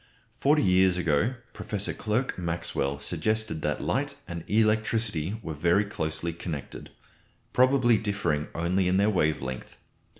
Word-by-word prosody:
Forty 150 +5 +3
years 95 -1 +4
ago 90 - +1 0.2
Professor 105 -1 -3
Clerk 115 +5 -1
Maxwell 85 -5 -2
suggested 110 0 -1
that 75 -1 -1
light - - -1
and 85 -1 -6
electricity 110 -3 +1
were 80 - -4
very 85 +7 +2
closely 85 -3 -2
connected, 80 -3 -6 0.6
probably 125 -3 +4
differing 90 -8 -1
only 90 +3 +1
in 90 +1 +2
their 100 +2 +3
wave 80 -7 +1
length. 65 -1 -6
90 Hz, 130 wpm, -27 LUFS, 80-110 Hz, 0.6 s, years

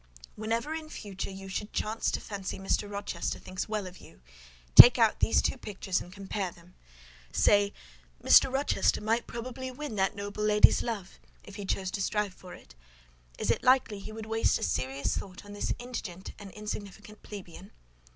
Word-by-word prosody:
"Whenever, 230 +7 -2
in 320 -1 -6
future, 200 -9 -6
you 195 0 -9
should 205 +2 -4
chance 220 +1 -1
to - - -2
fancy 195 -2 -6
Mr. 195 +2 -1
Rochester 200 -4 -3
thinks 185 +3 -6
well 215 -2 -2
of 185 0 -10
you, - - -16 0.5
take 245 - +12
out 225 -3 +3
these - - +3
two - - 0
pictures 195 -3 -3
and 175 - -11
compare 195 0 -4
them: 175 +1 -19 0.6
say, 200 - +4 0.5
'Mr. - - +7
Rochester 270 +2 +1
might 225 +2 0
probably 255 +2 -6
win 285 0 -6
that 190 0 +1
noble 205 +1 -5
lady's 210 0 +5
love, 210 -6 -5 0.2
if 200 - -12
he 205 - -6
chose 190 -1 -2
to 195 - -3
strive 210 0 -1
for 180 -1 -12
it; - - -17 0.6
is - - 0
it - - 0
likely 255 -5 +3
he 200 - -9
would 220 0 -7
waste 225 0 +1
a - - -6
serious 130 +9 -1
thought 190 0 -7
on 205 - -10
this 205 - -3
indigent 215 -7 -7
and 200 -1 -9
insignificant 210 0 -8
plebeian? 195 -2 -10
205 Hz, 180 wpm, -29 LUFS, 190-225 Hz, 0.6 s, take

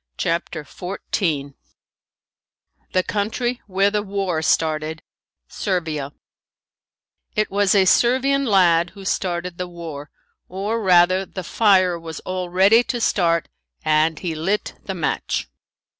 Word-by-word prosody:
CHAPTER 165 -1 -2
XIV 160 -4 -3 1.4
THE 185 - +2
COUNTRY 240 +5 -2
WHERE 195 +1 +2
THE 210 0 0
WAR 195 -5 -2
STARTED 160 -2 0 0.4
SERVIA 160 -7 -3 1.2
It 215 0 0
was 200 0 +2
a 195 -1 +5
Servian 265 +7 +3
lad 175 -6 +4
who 195 -1 -10
started 180 -2 -2
the 180 - -2
war, 165 -4 -8 0.4
or 205 +5 -2
rather 185 -1 +4
the 185 -1 -7
fire 185 -3 +3
was 165 -1 -7
all 185 -1 -4
ready 195 +6 +5
to 240 - -2
start 170 -7 +1 0.4
and 155 +1 +2
he 170 -1 -3
lit 180 +7 -1
the - - -4
match. - - -2
185 Hz, 120 wpm, -21 LUFS, 165-200 Hz, 1.4 s, a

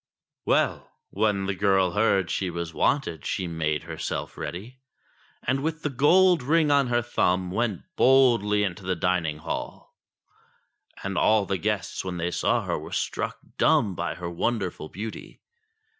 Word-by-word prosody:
Well! - - +1 0.2
when 100 -1 +1
the 100 - -1
girl 95 -2 +2
heard 100 -3 +2
she 95 - -1
was 85 -1 -5
wanted 85 - 0
she 95 - -2
made 80 -3 -2
herself - - -5
ready, 110 +9 -7 0.6
and 130 +2 0
with 160 +2 -3
the 150 - -1
gold 175 +6 +4
ring 150 +3 +2
on 140 -2 +4
her 120 0 +1
thumb, 90 -5 0
went 110 -2 -1
boldly 120 -6 +4
into 95 -2 -3
the 95 0 -1
dining 85 -3 0
hall. 80 +2 -6 1.1
And 95 -1 -1
all 110 -2 +3
the 95 -1 -2
guests 105 -4 -2
when 90 -1 -4
they 85 +1 -2
saw - - +1
her - - -2
were - - -9
struck - - -2 0.2
dumb 100 -4 +3
by - - -3
her 90 - -6
wonderful 90 -2 -2
beauty. 105 +4 -8
100 Hz, 155 wpm, -26 LUFS, 90-120 Hz, 1.1 s, gold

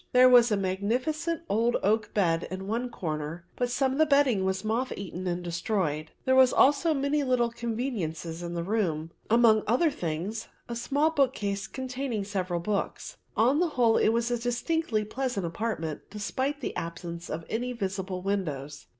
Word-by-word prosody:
There 250 0 +8
was 245 -2 +7
a 210 - +3
magnificent 250 - -1
old 230 +3 +2
oak 215 +2 +1
bed 170 -5 +2
in 190 +1 -5
one 235 +5 -2
corner 160 -3 -4
but 245 -1 0
some 265 +2 +1
of 265 - -2
the 315 - +5
bedding 280 -8 +4
was 190 0 -1
moth 230 +4 -1
eaten 185 -1 -5
and 175 0 -2
destroyed. 170 -3 -1 0.2
There 260 - +3
were 260 0 +8
also 295 +4 +4
many 280 +1 +1
little 250 -3 +2
conveniences 220 - -3
in 175 0 -5
the 170 - -2
room, 170 -6 -1 0.2
amongst 225 -1 +5
other 300 +7 +3
things 190 - -4 0.2
a 235 - -4
small 285 +6 +1
book 280 -5 +2
case 200 0 -2
containing 255 -4 -3
several 185 -4 -2
books. 200 +3 -3 0.2
On 255 +7 +4
the 355 - +3
whole 230 -2 +5
it - - +4
was 235 +1 +1
a 240 - 0
distinctly 245 -1 0
pleasant 245 -3 -2
apartment 165 -4 -3
despite 260 +7 -2
the - - -4
absence 170 0 -5
of 160 +1 -4
any 245 +3 -2
visible 190 -4 -3
windows. 150 -8 -3
220 Hz, 175 wpm, -28 LUFS, 180-255 Hz, 0.2 s, There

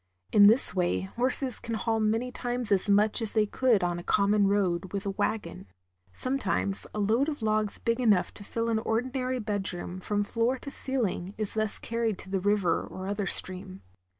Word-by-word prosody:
In 205 -1 +7
this 225 +5 +6
way 180 -2 0
horses 250 +5 +1
can 230 -1 -4
haul 225 +1 -1
many 225 +3 0
times 245 -3 -3
as 200 +1 +2
much 210 +3 +3
as 225 - -1
they 215 -1 +3
could 225 -1 +2
on 175 -1 -1
a - - -9
common 200 +1 +2
road 190 -2 0
with 200 0 -3
a 200 - -1
wagon. 100 - -3 0.4
Sometimes 255 - -1
a - - -2
load 225 +8 +2
of 290 -6 -6
logs 215 -1 0
big 230 +1 -1
enough 210 -7 +2
to - - -10
fill 230 +3 -3
an 220 - +1
ordinary 255 +3 -1
bedroom 195 -5 -4
from 205 +2 -1
floor 230 +5 0
to 280 - -8
ceiling 215 -10 -1
is 215 -2 -2
thus 215 -1 -1
carried 230 -3 -2
to 190 - -10
the 195 - 0
river 200 -3 +1
or 185 - -8
other 200 0 -2
stream. 185 +1 -1
210 Hz, 190 wpm, -28 LUFS, 195-230 Hz, 0.4 s, In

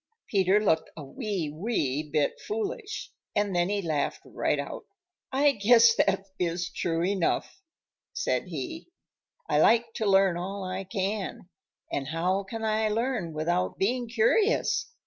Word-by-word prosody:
Peter 195 0 +3
looked 160 -7 +1
a 155 - -6
wee, 185 - -3
wee 155 - -1
bit 150 -1 -1
foolish, 430 0 -4 0.2
and 205 -2 +1
then 175 +1 +2
he 205 -1 -1
laughed 155 -4 -1
right - - -1
out. - - -5 0.5
"I 280 +2 +4
guess 230 0 +6
that 195 -2 +2
is 170 0 -1
true 165 0 -1
enough," 195 - 0 0.5
said - - -1
he. 330 -2 -6 0.6
"I - - +2
like 230 0 +4
to 220 - 0
learn 195 -2 +4
all 195 +3 -4
I 185 +1 -4
can, 195 -1 -3 0.4
and 135 -1 -2
how 175 +5 0
can 225 +3 -6
I 215 0 +1
learn 225 -5 -1
without 170 +4 -1
being 240 +4 0
curious? 400 - +2
195 Hz, 145 wpm, -28 LUFS, 175-230 Hz, 0.6 s, guess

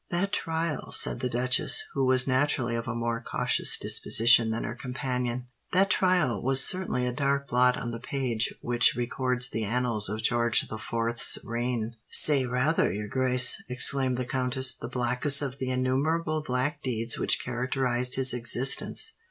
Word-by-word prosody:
"That 195 +4 -2
trial," 165 -5 -2
said - - +2
the 125 - -3
duchess, 125 +2 +2
who 135 - -2
was 130 -1 +2
naturally 130 -2 0
of 115 0 -5
a 120 - -4
more 115 0 -3
cautious - - +1
disposition 115 0 +4
than 110 +1 -4
her - - -5
companion,—"that 125 +7 -4
trial 175 - 0
was 135 +1 +4
certainly 180 -9 -1
a 125 - -3
dark 140 +1 -2
blot 125 0 +1
on 120 - -6
the 115 - -7
page 120 -3 -1
which 120 0 +2
records 125 +1 -2
the 110 - -4
annals 115 -2 +1
of 110 +1 -5
George 120 -1 +3
the 110 - -8
Fourth's 115 +1 +1
reign." 120 -1 -4
"Say 140 -4 +4
rather, 125 - 0
your 105 +2 -6
grace," 125 0 +2
exclaimed 130 0 +2
the 125 - -4
countess, 130 +1 +1
"the 115 - -9
blackest 125 +3 +2
of 135 -1 -6
the 130 - -4
innumerable 155 +5 -2
black 145 +1 -3
deeds 115 -2 -2
which - - +2
characterised 125 0 -2
his 130 -1 +2
existence. 125 - 0
125 Hz, 160 wpm, -26 LUFS, 120-135 Hz, -, disposition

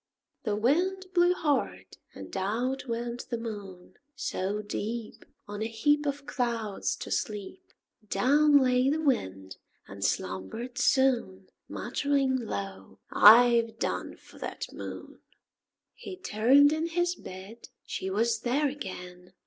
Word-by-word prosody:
The 210 -2 0
Wind 355 - +1
blew 350 0 +4
hard, 295 -6 -1 0.2
and - - -9
out 240 +8 -2
went 235 +1 -4
the 235 - -2
Moon. 205 -6 -8 0.2
So 210 -6 -2
deep, 220 +2 -5 0.2
On 205 +1 -6
a 220 - 0
heap 290 +7 +1
Of 285 0 -3
clouds, 230 -6 -2
to - - -8
sleep, 210 - -3 0.5
Down 290 +3 +4
lay 255 -1 +3
the 305 +3 0
Wind, 95 - -1 0.3
and - - -8
slumbered 225 - -3
soon 235 -8 +2 0.2
Muttering 275 -2 0
low, 200 -5 -5
"I've 230 +1 +7
done - - -3
for - - -17
that - - -6
Moon." - - -8 0.7
He 380 -2 -9
turned 275 - +4
in 315 +1 -1
his 350 +1 0
bed; 195 - -11 0.2
she 190 - -4
was 225 +4 +1
there 275 +5 +1
again! 180 -8 -8
235 Hz, 125 wpm, -28 LUFS, 205-285 Hz, 0.7 s, I've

